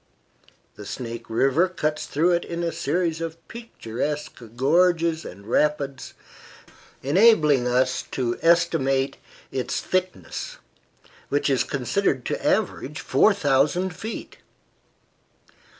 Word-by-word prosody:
The 105 - -9
Snake 115 -2 -6
River 135 +10 +2
cuts 155 -4 -2
through 165 +5 +2
it 175 0 +1
in 170 0 -4
a 170 - 0
series 165 +2 -1
of 165 0 -4
picturesque 150 - -5
gorges 165 +4 +2
and 100 +3 -10
rapids, 140 +2 -1 0.9
enabling 150 - +4
us 130 +1 +1
to 120 -2 -1
estimate 140 -6 +2 0.3
its 130 -2 -2
thickness, 185 0 -3 0.7
which 145 0 +1
is 130 - +2
considered 135 0 -1
to - - -3
average 150 +4 0
4000 160 0 +2
feet. 220 +6 -7
150 Hz, 105 wpm, -24 LUFS, 130-170 Hz, 0.9 s, enabling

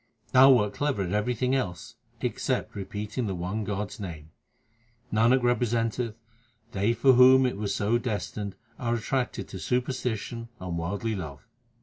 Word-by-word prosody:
Thou 130 +1 +8
wert 105 -4 +2
clever 145 -9 0
at 90 - -4
everything 125 +4 0
else 90 -11 -2 0.3
except - - -1
repeating 105 +4 -4
the 95 - -2
one 95 +5 -3
God 105 0 -3
s - - -10
name. 80 -6 -7 0.8
Nanak 120 +4 +4
representeth 120 -1 0 0.6
they 100 +2 +1
for 130 +3 +5
whom 130 +1 +7
it 125 - 0
was 100 -1 -2
so 110 +3 +1
destined 105 -3 -4 0.2
are 120 -1 0
attracted 125 +2 -2
to - - -7
superstition 125 -2 -2
and 90 -2 -4
worldly 100 +7 -2
love. 75 -8 -7
110 Hz, 145 wpm, -27 LUFS, 100-125 Hz, 0.8 s, Thou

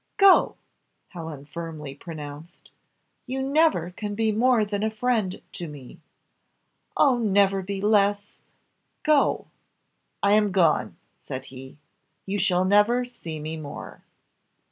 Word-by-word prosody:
"Go!" 395 -2 +6 0.5
Helen 160 -6 -8
firmly 155 -3 -7
pronounced. 150 +1 -10 0.6
"You 265 +1 -2
never 275 - +2
can 205 +2 -5
be 220 0 +1
more 230 0 +3
than 205 0 -3
a 220 - +1
friend 220 -4 -1
to 175 - -6
me! 145 -4 -11 1.0
Oh 260 -4 +4
never 200 -3 +3
be 195 +1 -5
less! 205 0 +1 0.6
go!" 300 -2 +2 0.8
"I 200 0 +4
am 210 -1 +3
gone," 175 -5 +2 0.2
said 130 +1 -6
he, 130 +2 -11 0.5
"you 200 +1 -2
shall 185 -1 +2
never 210 +6 +3
see 165 -10 -8
me 155 +1 -5
more." 145 -2 -9
200 Hz, 120 wpm, -25 LUFS, 160-220 Hz, 1.0 s, Go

